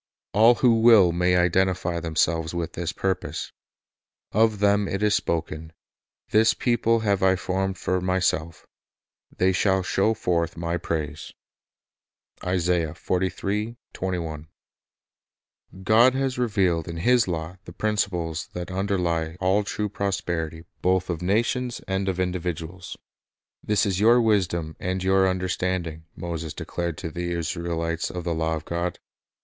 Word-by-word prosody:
All 115 +4 +6
who 115 -2 +3
will 110 -7 +7
may 90 +1 +2
identify 90 -1 +1
themselves 80 0 0
with 85 -2 -3
this 85 0 -3
purpose. 95 +2 -3 0.8
Of 110 0 +3
them 100 0 +3
it 100 +2 -2
is 105 -1 +3
spoken, 80 -3 -2 0.6
"This 110 +1 +4
people 115 -2 +2
have 100 -3 +1
I 95 0 +4
formed 95 +1 -2
for 90 +2 -1
Myself; 90 -3 -1 0.7
they 95 +1 +3
shall 95 +1 +2
show 100 +4 +1
forth 85 -5 -1
My 85 +1 -1
praise." 75 -3 -4 1.1
3 90 +4 -1 2.1
God 115 +5 +5
has 135 -1 -1
revealed 95 -9 +1
in 85 -1 -5
His 120 +5 +3
law 85 0 -4
the - - -9
principles 90 -4 -1
that 90 +1 -5
underlie 90 -4 -1
all 95 +3 +2
true 105 0 -3
prosperity 85 -5 -3 0.2
both 95 0 +1
of 85 -1 -4
nations 120 +6 0
and 95 0 -1
of 95 -1 -2
individuals. 90 -1 -4 0.7
"This 105 +1 +2
is 95 -2 0
your 115 +4 +6
wisdom 90 -8 +1
and 95 +1 -2
your 95 0 +4
under 95 0 -1
standing," 85 -3 -2
Moses 80 -2 -5
declared 85 -2 -4
to 80 - -5
the 85 +2 -3
Israelites 85 0 -2
of 90 -1 -5
the 85 -1 -1
law 80 0 0
of 80 -1 -7
God. 85 +1 -2
90 Hz, 135 wpm, -25 LUFS, 85-100 Hz, 2.1 s, will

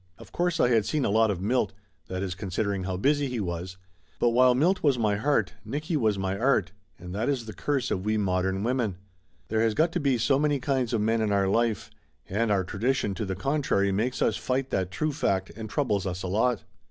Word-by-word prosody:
Of - - -14
course 175 -1 0
I 125 - +4
had 115 -4 +2
seen 150 -3 0
a - - +1
lot 110 +1 +4
of 95 -2 -2
Milt 105 -2 +1 0.3
that 95 +1 -3
is, 95 -2 -2
considering 100 0 -2
how 95 -1 -2
busy 145 +7 +2
he 125 -2 -3
was 90 -1 -4 0.4
but 120 - +3
while 125 +1 +5
Milt 180 +8 +2
was 140 -4 +3
my 105 -3 +1
heart, 140 +6 +1
Nicky 155 +4 -3
was 110 -8 +2
my 95 0 -1
art, 115 -7 +2 0.3
and 90 0 -9
that 110 +7 -1
is 130 -5 -1
the 110 - -7
curse 130 +7 -1
of 95 - -1
we 110 +1 +1
modern 95 -1 0
women; 120 -5 0 0.5
there 110 0 +1
has 115 -1 +2
got 165 +2 +3
to 175 - -1
be 140 -5 +2
so 135 +4 +2
many 145 -1 +1
kinds 130 -2 0
of 115 -3 +1
men 110 +1 +1
in 110 -1 0
our 100 -1 +2
life, 115 +1 0 0.4
and 110 +4 0
our 100 -2 +2
tradition 105 +3 -1
to 110 +2 -3
the 95 -1 -3
contrary, 130 - +1
makes 115 +6 0
us - - +1
fight 130 +1 -2
that 95 -2 0
true 155 +11 -1
fact, 100 -10 0
and 110 0 -7
troubles 105 -8 0
us 90 0 -4
a - - -2
lot. 110 +5 +1
110 Hz, 230 wpm, -27 LUFS, 95-130 Hz, 0.5 s, while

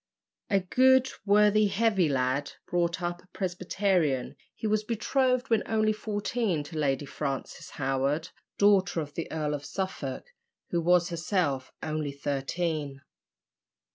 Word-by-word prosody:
A 195 -2 +3
good, 260 +7 +4 0.2
worthy, 210 +1 +5
heavy 200 -5 +2
lad, 135 +1 0
brought 170 0 0
up 175 0 -2
a - - -25
Presbyterian, 180 -7 0 0.2
he - - -6
was 215 0 +1
betrothed 250 +3 0
when 225 -2 +4
only 215 -1 +2
fourteen 210 -4 -1
to 160 +3 -10
Lady 140 -1 0
Frances 135 -1 -5
Howard, 135 +3 -1 0.3
daughter 195 -4 +4
of 145 -1 -7
the 165 - -5
Earl 150 -2 -1
of 145 -1 -4
Suffolk, 185 -7 -4 0.5
who 170 - +1
was 175 +1 +3
herself 165 -6 -1
only 155 -2 -2
thirteen. 140 +1 -2
175 Hz, 130 wpm, -28 LUFS, 145-210 Hz, 0.5 s, worthy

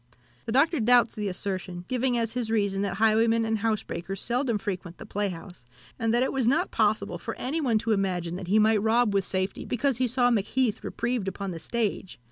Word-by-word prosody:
The - - -2
Doctor 300 +6 +3
doubts 240 +1 +4
the 210 -1 -3
assertion, 185 -2 -4
giving 250 -1 0
as 230 -1 -1
his 245 -3 -2
reason 200 -3 0
that 200 - -1
highwaymen 225 +2 +3
and 220 -1 0
housebreakers 195 -4 -2
seldom 245 -1 0
frequent 185 -4 -5
the - - -10
playhouse, 185 - -5 0.3
and 225 -2 +1
that 240 +2 +3
it - - -1
was 265 -4 +1
not 265 - +2
possible 210 -5 0
for - - -5
any 300 +6 -2
one 240 -6 +2
to 225 +1 -1
imagine 180 -4 -1
that 185 -2 -7
he 205 +4 +3
might 215 -1 +4
rob 225 0 +2
with 195 -1 +1
safety, 190 +1 -2
because 255 +1 0
he 255 0 +1
saw 245 0 +2
Macheath 225 +1 0
reprieved 235 -4 -2
upon 195 0 -4
the 165 - -6
stage. 210 0 -2
220 Hz, 205 wpm, -27 LUFS, 195-240 Hz, 0.3 s, doubts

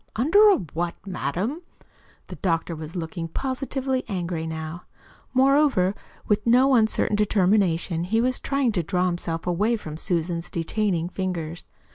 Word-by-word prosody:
"Under 370 - +6
a 400 - +6
what, 170 +1 -4
madam?" 190 - -3 0.6
The - - -9
doctor 165 -2 -1
was 155 +2 -8
looking 165 0 -4
positively 265 - -2
angry 175 -5 -3
now. 160 +1 -6 0.5
Moreover, 265 -8 +3 0.3
with 210 +2 +1
no 255 +3 +5
uncertain 220 -3 +2
determination, 190 -5 +2
he 225 +5 +1
was 255 +2 +1
trying 275 -3 0
to 190 -5 0
draw 180 +2 0
himself 170 -2 -2
away 200 +7 +1
from 155 -7 -8
Susan's 170 0 -2
detaining 175 0 -1
fingers. 175 -3 -4
185 Hz, 135 wpm, -24 LUFS, 170-235 Hz, 0.6 s, Under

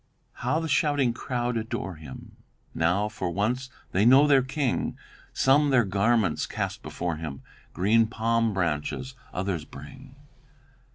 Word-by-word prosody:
"'How 155 - -1
the 165 - -3
shouting 145 -4 +2
crowd 120 -1 -2
adore 110 -3 -4
him, 75 -5 -11 0.4
Now, 90 +6 +1
for 105 -4 -4
once, 120 +8 -1 0.2
they 95 - +2
know 130 +5 +7
their 140 -2 +5
King; 130 0 -2 0.3
Some 145 +2 +3
their 130 -3 +4
garments 100 -2 +1
cast - - -4
before 85 -2 -4
him, 75 -4 -7 0.3
Green 110 +5 +3
palm 115 0 +1
branches 90 - -2 0.2
others 90 -4 -2
bring. 125 - -12
115 Hz, 130 wpm, -26 LUFS, 90-130 Hz, 0.4 s, know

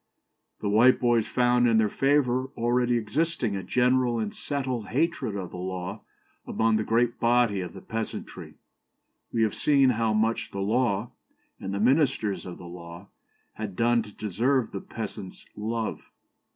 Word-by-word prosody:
The 105 - -2
Whiteboys 120 +1 +4
'found 125 -1 +3
in 115 -1 +4
their 110 -1 +4
favour 130 0 +1
already 120 +1 +2
existing 120 -1 -1
a 95 - -3
general 125 +4 +2
and 110 -2 -2
settled 130 -6 -3
hatred 150 -5 -1
of 95 -3 -5
the - - -8
law 90 0 -5 0.5
among 110 -1 +2
the 110 - 0
great 115 +2 +1
body 115 -4 +3
of 90 -2 -6
the - - -10
peasantry.' 110 0 -6 0.8
We 115 - +1
have 110 - +1
seen 140 -3 +4
how 115 -1 0
much 110 +2 0
the 100 - -6
law, 110 +1 0 0.5
and 95 - -5
the 100 - -2
ministers 125 -5 +1
of 90 - -7
the - - -11
law, 85 +2 -10 0.4
had 105 -4 -6
done 120 +2 +3
to 105 -1 -10
deserve 115 +5 0
the 95 - -5
peasant's 105 -4 -7
love. 110 +1 -3
115 Hz, 155 wpm, -27 LUFS, 100-125 Hz, 0.8 s, Whiteboys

